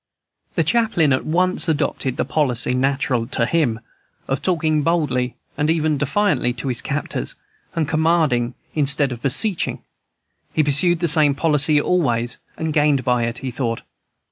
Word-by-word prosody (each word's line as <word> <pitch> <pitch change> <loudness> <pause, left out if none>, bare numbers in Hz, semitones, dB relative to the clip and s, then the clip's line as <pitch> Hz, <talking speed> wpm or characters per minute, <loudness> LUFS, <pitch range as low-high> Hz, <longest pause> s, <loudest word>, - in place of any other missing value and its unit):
The - - +2
chaplain 220 - +2
at 130 - -2
once 180 +2 +2
adopted 135 -4 -1
the - - 0
policy, 125 -6 0
natural 135 -2 0
to 120 -2 0
him, 125 -6 0 0.5
of 135 - -2
talking 160 -4 0
boldly 140 -7 0 0.2
and 150 +1 -1
even 155 -3 +1
defiantly 150 - 0
to 130 +2 -4
his 120 -2 0
captors, 150 +1 -4 0.4
and 160 -3 0
commanding 155 -6 +1 0.2
instead 140 -2 +2
of 120 -1 -7
beseeching. 180 - +2 0.7
He 155 - +2
pursued 160 +4 +3
the 170 - +1
same 150 -3 +4
policy 150 -1 +2
always 120 -9 0 0.2
and 160 -1 -3
gained 145 -3 +2
by 125 -1 +1
it, 115 +1 -4
he 130 - -3
thought. 115 -2 -3
145 Hz, 150 wpm, -20 LUFS, 125-160 Hz, 0.7 s, same